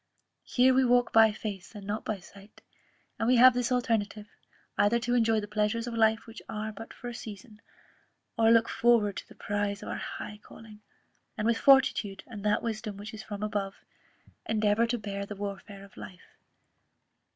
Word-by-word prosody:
Here 255 +1 +4
we 260 +1 +4
walk 245 -1 +3
by 225 -1 +7
faith, 210 -1 -7
and 205 -1 -9
not 210 +2 -3
by 215 - -3
sight; 200 +3 -17 0.6
and 225 - 0
we 255 - +5
have 255 +1 +8
this 245 +1 -1
alternative, 220 -4 0 0.5
either 205 +3 +3
to 240 +1 -2
enjoy 225 -2 +3
the 205 - -6
pleasures 210 +2 -1
of 240 - -5
life 220 0 +2
which 225 0 -11
are 215 -1 -4
but 225 +2 -10
for 245 - -9
a 240 - -5
season, 215 -1 -10 0.7
or 225 -1 +4
look 230 0 +5
forward 230 -4 +2
to - - -7
the - - -16
prize 205 0 -3
of - - -7
our - - -3
high 210 0 -7
calling, 215 -1 -14 0.6
and 210 - -2
with 230 0 +2
fortitude, 265 -7 +4
and 210 -4 -9
that 210 0 +1
wisdom 215 -2 -4
which 205 +2 -8
is 220 - -7
from 210 -1 -7
above, 205 -2 -2 0.7
endeavour 215 +1 +2
to 240 +1 -1
bear 200 -2 -5
the 210 - -7
warfare 200 0 -7
of 200 - -20
life. 100 -4 -11
215 Hz, 185 wpm, -29 LUFS, 205-230 Hz, 0.7 s, have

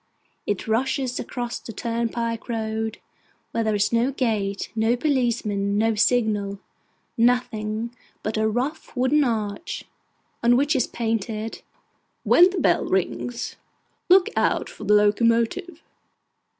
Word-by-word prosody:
It 205 0 -2
rushes 255 +3 0
across 240 -2 -4
the - - -9
turnpike 230 +1 -2
road, 220 -1 -2 0.5
where 230 - 0
there 215 -1 +1
is 205 +2 +1
no 235 +3 +2
gate, 215 -7 -1
no 225 +2 +2
policeman, 235 -7 0
no 225 +1 +2
signal: 215 -3 +1 0.6
nothing 230 -1 +1 0.3
but 215 - -2
a 220 0 +2
rough 255 +6 -3
wooden 265 +4 +3
arch, 220 +3 -3 0.6
on 240 +1 +5
which 285 +3 +2
is 255 - +2
painted 225 -1 -3 0.6
'WHEN 355 +2 +6
THE 375 - -5
BELL - - +2
RINGS, 235 +6 -2 0.5
LOOK 370 0 +6
OUT - - +1
FOR - - -9
THE 210 - +5
LOCOMOTIVE. 230 - +2
230 Hz, 125 wpm, -24 LUFS, 215-250 Hz, 0.6 s, WHEN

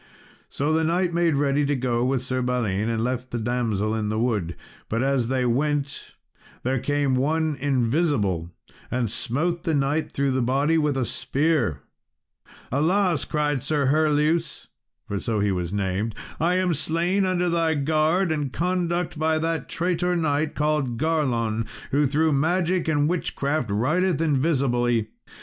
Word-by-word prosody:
So 145 +3 -1
the 160 0 +2
knight 175 +2 +1
made 170 -2 +2
ready 140 +1 +2
to 145 0 +1
go 120 -2 0
with 130 0 0
Sir 130 0 -2
Balin, 115 -4 0
and 115 -1 -1
left 125 +1 -2
the 120 - -3
damsel 110 -3 -1
in 110 -2 -1
the 110 - -1
wood. 105 -8 -1 0.3
But 115 +3 0
as 135 -3 +1
they 130 0 0
went, 140 +3 -1 0.5
there 130 +1 0
came 145 0 0
one 155 +4 +1
invisible, 120 - +1 0.4
and 120 -4 -1
smote 165 +11 -1
the 160 -2 0
knight 145 +3 0
through 140 -1 0
the 130 0 0
body 140 +6 +2
with 150 -3 0
a 130 - 0
spear. 135 - 0 0.9
"Alas," 170 +4 +2
cried 150 -3 0
Sir 145 -2 0
Herleus 155 +2 +1 0.4
(for 100 - -2
so 115 0 -2 0.2
was 90 -2 -2
he 100 - -3
named), 100 +3 -2 0.2
"I 170 +3 +2
am 185 -1 +1
slain 170 +6 0
under 180 -1 +1
thy 165 -2 +1
guard 155 +5 +1
and 145 -4 -1
conduct, 175 -1 -1
by 160 0 +2
that 165 0 -2
traitor 180 +1 0
knight 155 -2 0
called 150 -5 0
Garlon, 120 -8 0 0.2
who 145 +1 +3
through 155 +3 +2
magic 175 +4 +1
and 150 -2 +2
witchcraft 155 - -1
rideth 155 - +1
invisibly. 130 -7 +1
145 Hz, 155 wpm, -24 LUFS, 120-160 Hz, 0.9 s, who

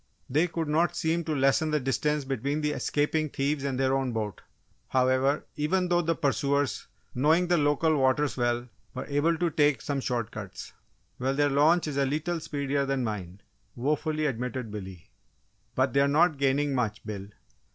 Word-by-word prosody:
They 155 +7 +2
could 165 -2 -3
not 165 +3 +1
seem 170 0 0
to 155 -2 -1
lessen 135 +3 +2
the 150 0 +1
distance 140 +3 0
between 140 +3 -2
the 150 0 0
escaping 150 +1 0
thieves 140 +1 -1
and 135 -2 -2
their 135 0 +2
own 135 -2 0
boat, 105 -4 -3 0.5
however, 130 +2 +2
even 180 +5 +1
though 175 0 +3
the 165 0 0
pursuers, 140 -2 0 0.3
knowing 160 +7 +3
the 175 - +4
local 150 +2 +2
waters 135 +1 +2
well, 120 0 0 0.3
were 130 - -4
able 150 +4 +1
to 175 -1 0
take 145 -4 +3
some 140 +2 -2
short 120 -4 -2
cuts. 100 -4 -8 0.5
"Well, 135 +2 0
their 145 0 +2
launch 155 +5 +4
is 150 -3 -4
a 140 - +3
lee 145 +3 0
tle 175 +2 -2
speedier 140 -2 -2
than 135 -2 0
mine," 100 -4 -5 0.3
wofully 150 +4 -1
admitted 125 -3 -3
Billy. 95 -5 -8 0.6
"But 130 -1 +1
they're 140 0 +4
not 155 +1 +3
gaining 140 +1 +2
much, 110 -5 -2
Bill! 100 -2 -6
140 Hz, 175 wpm, -28 LUFS, 130-155 Hz, 0.6 s, the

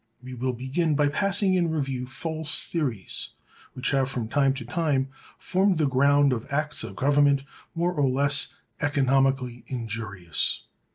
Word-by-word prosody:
We 130 0 -8
will 125 +1 -2
begin 140 +6 -1
by 145 0 +3
passing 195 +4 +2
in 175 -2 +2
review 135 -5 -2
false 160 +3 -2
theories 125 - -2 0.4
which 130 - -2
have 135 -2 +1
from 120 -4 -3
time 135 +1 +2
to 125 -3 -6
time 135 0 0 0.3
formed 190 +1 +1
the 155 - +2
ground 140 +1 +4
of 115 +1 -5
acts 150 -1 -1
of 100 -4 -7
government 140 +1 +3 0.3
more 175 +2 0
or 145 -5 +2
less 140 +2 +2 0.3
economically 135 -3 +1
injurious. 110 - -1
135 Hz, 150 wpm, -26 LUFS, 125-150 Hz, 0.4 s, ground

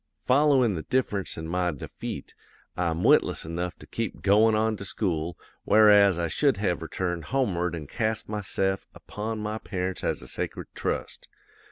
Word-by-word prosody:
"'Followin' 130 -4 +3
the 80 - -3
difference 100 - -1
an' 80 0 -5
my 90 +1 0
defeat, 75 - -7 0.4
I'm 85 -1 -1
witless - - +4
enough 85 +2 -3
to - - -13
keep 115 -2 -4
goin' 110 +2 +5
on 110 0 +1
to 100 - -7
school, 85 -4 -2 0.3
whereas 105 -3 +6
I 85 -1 0
should 135 - +2
have 90 -4 0
returned 85 0 -3
homeward 90 -9 0
an' 80 -3 -6
cast 110 - -2
myse'f 95 -2 -1
upon 110 +2 -5
my 105 +1 -3
parents 95 -3 -4
as - - -1
a - - -10
sacred - - -4
trust. - - -4
95 Hz, 160 wpm, -27 LUFS, 85-110 Hz, 0.4 s, whereas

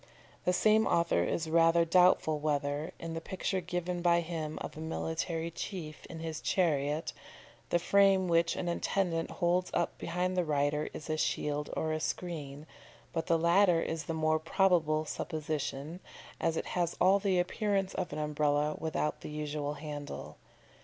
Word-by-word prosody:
The 180 - +4
same 215 +4 +4
author 170 - +2
is 160 - -1
rather 165 +1 +4
doubtful 165 -3 +4
whether, 145 0 -1
in 165 -1 -6
the 165 - -4
picture 190 +2 -2
given 175 0 -3
by 170 0 +4
him 160 -2 -4
of - - -6
a - - -8
military 160 +1 -2
chief 165 -3 -6
in 165 -1 -8
his 160 -1 -4
chariot, 150 -3 0 0.6
the - - +3
frame 195 +1 +4
which 170 0 +2
an 175 - -3
attendant 170 -1 0
holds 180 0 +1
up - - 0
behind 180 +2 -1
the 180 - +2
rider 150 -1 0
is 150 - -8
a 155 -1 -1
shield 150 -1 -1
or 155 0 0
a 155 - -1
screen, 155 -4 -4 0.5
but 165 -2 -2
the 165 - +4
latter 170 +1 +4
is 165 0 -3
the 165 - -3
more 155 0 +2
probable 160 -3 +2
supposition, 155 0 -4 0.4
as 165 -1 0
it - - -2
has 175 -2 0
all 190 +2 +5
the 195 -2 +1
appearance 195 +1 0
of 185 - -3
an 150 - -5
Umbrella 150 0 +1
without 155 -1 -2
the - - -7
usual 150 -1 -3
handle. 145 -1 -7
165 Hz, 165 wpm, -31 LUFS, 155-180 Hz, 0.6 s, all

